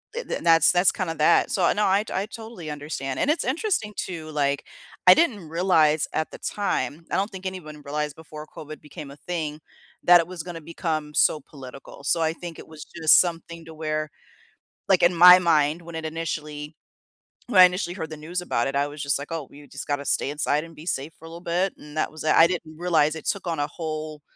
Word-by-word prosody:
Eh, 485 Hz, -, -3 dB
th -, -, -4 dB
that's 165 Hz, -2 st, +5 dB
that's 180 Hz, +1 st, +4 dB
kinda 175 Hz, -4 st, -3 dB
that. 155 Hz, +2 st, +3 dB
So, 185 Hz, -3 st, +2 dB
no, 210 Hz, -, 0 dB
I 195 Hz, +2 st, +3 dB
t -, -, -8 dB
I 190 Hz, -, -1 dB
totally 220 Hz, -8 st, -9 dB
understand. 145 Hz, -3 st, -5 dB
And -, -, +1 dB
it's 310 Hz, -, +1 dB
interesting 265 Hz, -, -1 dB
too, 165 Hz, -4 st, -5 dB
like, 140 Hz, -2 st, 0 dB, 0.4 s
I 180 Hz, -, +12 dB
didn't 205 Hz, -, 0 dB
realize 160 Hz, -3 st, +3 dB
at 155 Hz, -, -2 dB
the -, -, -9 dB
time- 170 Hz, -5 st, -2 dB
I -, -, +1 dB
don't 200 Hz, +2 st, 0 dB
think 190 Hz, -1 st, -9 dB
anyone 160 Hz, -5 st, -7 dB
realized 150 Hz, 0 st, -3 dB
before 155 Hz, -1 st, -10 dB
COVID 155 Hz, -1 st, -10 dB
became 150 Hz, -1 st, -10 dB
a 140 Hz, -, -13 dB
thing- 155 Hz, -3 st, -4 dB, 0.4 s
that 175 Hz, 0 st, +7 dB
it 165 Hz, -, -7 dB
was 180 Hz, -2 st, -7 dB
gonna 175 Hz, -2 st, -8 dB
become 155 Hz, -2 st, -4 dB
so 150 Hz, -, +3 dB
political. 135 Hz, 0 st, -12 dB
So 165 Hz, +4 st, +2 dB
I 160 Hz, -1 st, +2 dB
think 170 Hz, -1 st, -9 dB
it -, -, -11 dB
was 155 Hz, -1 st, -10 dB
just 160 Hz, -2 st, +5 dB
something 170 Hz, -1 st, -2 dB
to 165 Hz, -, -11 dB
where, 155 Hz, -1 st, -3 dB, 0.8 s
like, 190 Hz, -2 st, +4 dB
in 175 Hz, +1 st, +5 dB
my 180 Hz, +1 st, +9 dB
mind, 160 Hz, -2 st, +2 dB
when 170 Hz, 0 st, -11 dB
it 160 Hz, 0 st, -5 dB
initially 155 Hz, -2 st, -5 dB, 0.7 s
when 205 Hz, -6 st, +3 dB
I -, -, +12 dB
initially 180 Hz, 0 st, -1 dB
heard 160 Hz, -4 st, -6 dB
the 155 Hz, -, -6 dB
news 175 Hz, +2 st, -2 dB
about 120 Hz, -9 st, -1 dB
it, 135 Hz, -, -4 dB
I 140 Hz, 0 st, +2 dB
was 145 Hz, +1 st, -7 dB
just 140 Hz, 0 st, +1 dB
like, 140 Hz, +3 st, -8 dB
"Oh, 160 Hz, -4 st, -4 dB
you 145 Hz, +1 st, -14 dB
just 140 Hz, -, -8 dB
gotta 145 Hz, -1 st, -2 dB
stay -, -, +1 dB
inside 150 Hz, 0 st, 0 dB
and 165 Hz, 0 st, -13 dB
be 155 Hz, +2 st, -12 dB
safe 155 Hz, -2 st, -3 dB
for -, -, -15 dB
a -, -, -9 dB
little 170 Hz, +1 st, -10 dB
bit," 180 Hz, +2 st, 0 dB
and 150 Hz, +1 st, -12 dB
that -, -, 0 dB
was 155 Hz, 0 st, -10 dB
tha 155 Hz, -, +2 dB
I 165 Hz, -, +9 dB
didn't 165 Hz, -3 st, -4 dB
realize 160 Hz, -3 st, +2 dB
it 160 Hz, -, -9 dB
took 200 Hz, -2 st, -2 dB
on 165 Hz, -1 st, -1 dB
a 145 Hz, -, +1 dB
whole 155 Hz, -1 st, -6 dB
160 Hz, 230 wpm, -24 LUFS, 150-180 Hz, 0.8 s, I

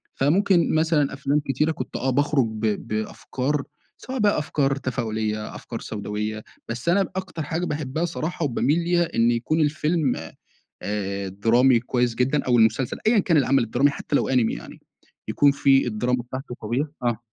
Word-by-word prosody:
فممكن 170 Hz, +4 st, +3 dB
مثلًا 155 Hz, -3 st, +2 dB
أفلام 140 Hz, +1 st, 0 dB
كتيرة 150 Hz, +4 st, +1 dB
كنت 130 Hz, -4 st, -6 dB
آه 130 Hz, -, -1 dB
باخرج 140 Hz, -1 st, +2 dB
ب 110 Hz, 0 st, -2 dB
بأفكار، 130 Hz, +6 st, -2 dB, 0.3 s
سواء 260 Hz, -1 st, -6 dB
بقى 205 Hz, -6 st, +3 dB
أفكار 140 Hz, -2 st, 0 dB
تفاؤلية، 110 Hz, -5 st, -3 dB
أفكار 115 Hz, -, -7 dB
سوداوية. 105 Hz, +1 st, -4 dB, 0.3 s
بس 120 Hz, +9 st, -3 dB
أنا 195 Hz, +2 st, +4 dB
ب -, -, -7 dB
أكتر 185 Hz, -4 st, -4 dB
حاجة 165 Hz, +4 st, -2 dB
باحبها 150 Hz, +2 st, -2 dB
صراحة، 165 Hz, -1 st, -3 dB
وباميل 145 Hz, +5 st, +1 dB
ليها، 175 Hz, 0 st, 0 dB
إن 115 Hz, +1 st, +4 dB
يكون 125 Hz, +7 st, 0 dB
الفيلم 150 Hz, -1 st, +1 dB, 0.7 s
آآ 100 Hz, -1 st, -3 dB
درامي 115 Hz, +5 st, +3 dB
كويس 125 Hz, -1 st, 0 dB
جدًا، 135 Hz, +4 st, +1 dB
أو 120 Hz, -2 st, +3 dB
المسلسل، 115 Hz, +3 st, +2 dB
أيًا 225 Hz, -1 st, +5 dB
كان 170 Hz, -4 st, +2 dB
العمل 135 Hz, -2 st, +3 dB
الدرامي، 125 Hz, +5 st, +2 dB
حتى 145 Hz, -, -2 dB
لو -, -, +1 dB
أنمي 125 Hz, -4 st, +2 dB
يعني. -, -, -10 dB, 0.5 s
يكون 145 Hz, -1 st, +4 dB
في 135 Hz, -2 st, +3 dB
الدراما 120 Hz, +2 st, 0 dB
بتاعته 125 Hz, +1 st, -7 dB
قوية 130 Hz, +7 st, -2 dB
آه. 120 Hz, -2 st, 0 dB
135 Hz, 165 wpm, -24 LUFS, 115-155 Hz, 0.7 s, أيًا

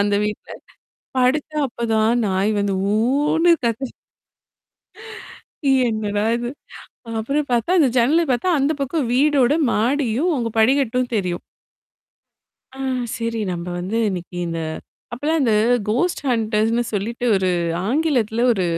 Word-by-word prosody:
அந்த 205 Hz, 0 st, +2 dB
வீட்ல. 210 Hz, 0 st, -5 dB, 0.7 s
படுத்தா 280 Hz, +5 st, +1 dB
அப்பதான் 230 Hz, 0 st, +1 dB
நாயி 195 Hz, +2 st, +1 dB
வந்து 200 Hz, -1 st, 0 dB, 0.2 s
ஊன்னு 290 Hz, +9 st, +2 dB, 0.2 s
கத்த 235 Hz, +3 st, -1 dB, 2.0 s
என்னடா 210 Hz, -1 st, -1 dB
இது. 240 Hz, 0 st, -4 dB, 0.7 s
அப்புறம் 280 Hz, +5 st, -1 dB
பார்த்தா 240 Hz, +7 st, +1 dB
அந்த 290 Hz, -, +5 dB
ஜன்னல 280 Hz, +8 st, +4 dB
பார்த்தா 250 Hz, +9 st, 0 dB
அந்த 280 Hz, +3 st, +2 dB
பக்கம் 275 Hz, -1 st, -1 dB
வீடோட 280 Hz, 0 st, +3 dB, 0.2 s
மாடியும், 255 Hz, +6 st, +1 dB
அவங்க 235 Hz, -4 st, -2 dB
படிகட்டும் 250 Hz, 0 st, +2 dB
தெரியும். 180 Hz, -4 st, -2 dB, 1.3 s
ஆ. -, -, -12 dB, 0.4 s
சரி 230 Hz, -1 st, -2 dB
நம்ப 170 Hz, 0 st, -5 dB
வந்து 190 Hz, +5 st, -3 dB
இன்னைக்கு 180 Hz, -2 st, -5 dB
இந்த 165 Hz, -1 st, -3 dB, 0.5 s
அப்பலாம் 305 Hz, +5 st, 0 dB
அந்த 230 Hz, -, +2 dB, 0.4 s
கோஸ்ட் 320 Hz, +13 st, 0 dB
ஹன்டர்ஸ்ன்னு 225 Hz, 0 st, +1 dB
சொல்லிட்டு 230 Hz, +5 st, -3 dB
ஒரு 190 Hz, -1 st, +1 dB, 0.4 s
ஆங்கிலத்தில 245 Hz, -5 st, +1 dB
ஒரு 190 Hz, -5 st, -1 dB
235 Hz, 115 wpm, -21 LUFS, 215-275 Hz, 2.0 s, அந்த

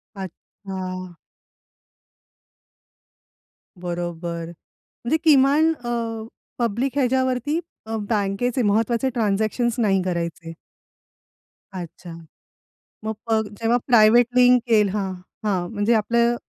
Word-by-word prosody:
अच्छा. 185 Hz, -1 st, -7 dB, 2.6 s
बरोबर. 175 Hz, -1 st, -4 dB, 0.6 s
म्हणजे 295 Hz, +7 st, +2 dB
किमान 295 Hz, +2 st, +5 dB
अ, 230 Hz, -2 st, -2 dB, 0.4 s
पब्लिक 235 Hz, +3 st, 0 dB
ह्याच्यावरती 260 Hz, +3 st, +1 dB, 0.3 s
अ, 225 Hz, 0 st, -3 dB
बँकेचे 220 Hz, +4 st, 0 dB
महत्त्वाचे 225 Hz, +4 st, +1 dB
ट्रान्झॅक्शन्स 220 Hz, +2 st, 0 dB
नाही 195 Hz, -4 st, +2 dB
करायचे. 170 Hz, -2 st, -3 dB, 1.3 s
अच्छा, 175 Hz, 0 st, -9 dB, 0.9 s
मग 220 Hz, 0 st, -2 dB
प 225 Hz, -1 st, +3 dB, 0.2 s
जेव्हा 230 Hz, +2 st, +3 dB
प्रायव्हेट 235 Hz, 0 st, +6 dB
लिंक 250 Hz, -1 st, +5 dB, 0.3 s
हां, 195 Hz, -2 st, -1 dB, 0.4 s
हां, 180 Hz, -4 st, 0 dB
म्हणजे 215 Hz, +2 st, +1 dB
आपलं 235 Hz, +2 st, +2 dB
220 Hz, 85 wpm, -23 LUFS, 190-245 Hz, 2.6 s, प्रायव्हेट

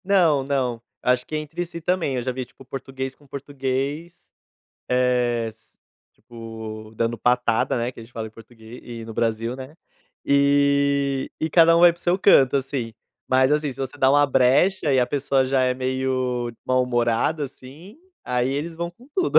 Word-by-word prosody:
Não, 170 Hz, -8 st, +3 dB
não. 130 Hz, -4 st, -1 dB, 0.2 s
Acho 125 Hz, 0 st, +2 dB
que 155 Hz, -, -4 dB
é -, -, +1 dB
entre 155 Hz, +3 st, -4 dB
si 170 Hz, 0 st, -8 dB
também. 170 Hz, -5 st, 0 dB
Eu 125 Hz, -, -2 dB
já 130 Hz, -, -1 dB
vi, 130 Hz, 0 st, -5 dB
tipo, 135 Hz, +2 st, -18 dB
português 135 Hz, 0 st, -6 dB
com 145 Hz, -, -23 dB
português, 140 Hz, +4 st, -4 dB, 0.6 s
eh, 125 Hz, -2 st, +1 dB
s 110 Hz, 0 st, -17 dB, 0.3 s
tipo, 110 Hz, -2 st, -9 dB
dando 115 Hz, +1 st, 0 dB
patada, 125 Hz, -1 st, +1 dB
né, 120 Hz, +1 st, -2 dB
que -, -, -12 dB
a -, -, -9 dB
gente 115 Hz, +2 st, -16 dB
fala 110 Hz, -2 st, -5 dB
em -, -, -10 dB
português 115 Hz, +1 st, -14 dB
e 115 Hz, -2 st, -8 dB
no 110 Hz, 0 st, -9 dB
Brasil, 115 Hz, +1 st, -1 dB
né. 130 Hz, +3 st, -9 dB, 0.5 s
E 140 Hz, -1 st, +2 dB
e 160 Hz, -, 0 dB
cada 165 Hz, +1 st, +6 dB
um -, -, +4 dB
vai 175 Hz, 0 st, +8 dB
para 170 Hz, -, -18 dB
o -, -, -13 dB
seu 180 Hz, +2 st, +2 dB
canto, 140 Hz, -9 st, +5 dB
assim. 130 Hz, -4 st, -3 dB, 0.4 s
Mas, 130 Hz, +2 st, +4 dB
assim, 150 Hz, -2 st, 0 dB
se 130 Hz, -, -19 dB
você 135 Hz, +1 st, -4 dB
dá 130 Hz, -1 st, +4 dB
uma 145 Hz, +1 st, +5 dB
brecha 140 Hz, +6 st, +3 dB
e 130 Hz, -, +3 dB
a 125 Hz, -, +3 dB
pessoa 135 Hz, -1 st, +1 dB
já 130 Hz, 0 st, +1 dB
é 125 Hz, 0 st, +2 dB
meio 130 Hz, -1 st, -1 dB, 0.2 s
mal 130 Hz, 0 st, +3 dB
humorada 120 Hz, +5 st, 0 dB
assim, 140 Hz, -, -12 dB, 0.3 s
aí 125 Hz, 0 st, 0 dB
eles 145 Hz, +5 st, -3 dB
vão 170 Hz, +1 st, -4 dB
com 235 Hz, +9 st, -20 dB
tudo. 370 Hz, 0 st, +4 dB
130 Hz, 190 wpm, -23 LUFS, 120-145 Hz, 0.6 s, vai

